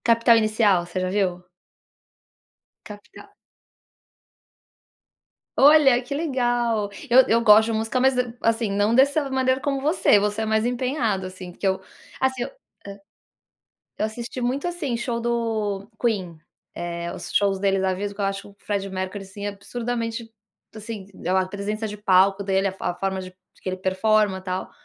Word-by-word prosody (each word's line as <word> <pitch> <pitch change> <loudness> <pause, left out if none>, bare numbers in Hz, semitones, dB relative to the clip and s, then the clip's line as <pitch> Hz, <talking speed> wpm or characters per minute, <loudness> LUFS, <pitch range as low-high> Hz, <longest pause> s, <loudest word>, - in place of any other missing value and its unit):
Capital 230 0 +5
inicial, 215 -5 +2
você 175 +1 -4
já 185 0 -1
viu? 185 -3 0 1.4
Capital 205 -1 -12 2.3
Olha, 275 -3 +6
que 255 +3 -5
legal. 240 -8 0 0.2
Eu 255 +2 +6
eu 230 +1 +3
gosto 215 0 +7
de 225 - -2
música, 225 +3 -1
mas 265 +1 +3
d 250 -2 -1
assim, 225 -2 +1
não 205 +3 +2
dessa 280 +2 +3
maneira 260 0 +1
como 275 -1 -2
você, 300 - +4
você 210 +1 0
é - - -1
mais 220 +1 +1
empenhado, 245 -5 -1
assim, 185 -1 -8
porque 195 - -3
eu 190 0 0 0.4
assim 260 -2 0
eu - - -4
hã. - - -19 1.5
Eu - - 0
assisti 235 +3 -6
muito, 260 +6 -1
assim, 340 -9 -2
show 235 0 -2
do 220 -4 -2
Queen, 195 -8 -1 0.4
eh, 170 0 -5
os 180 -1 -8
shows 195 -1 +2
deles 195 -1 +1
ao 190 -1 +1
vivo, 200 +1 -4
que 205 - -5
eu - - +1
acho 195 0 -2
que - - -14
o 200 - -17
Freddie 200 -1 -2
Mercury, 190 +1 -4
assim, 200 +1 -8
absurdamente, 230 +3 -4 0.4
assim, 215 -2 -7 0.2
a 185 +1 +3
a 185 - -1
presença 210 +3 -4
de 210 0 -7
palco 195 0 +3
dele, 195 0 +1
a - - -2
fo 190 - -11
a 175 - -1
forma 190 0 -2
de 185 0 -9 0.3
que - - -4
ele 185 - -3
performa 190 +1 +1
tal, 185 0 -4
215 Hz, 170 wpm, -23 LUFS, 195-240 Hz, 2.3 s, gosto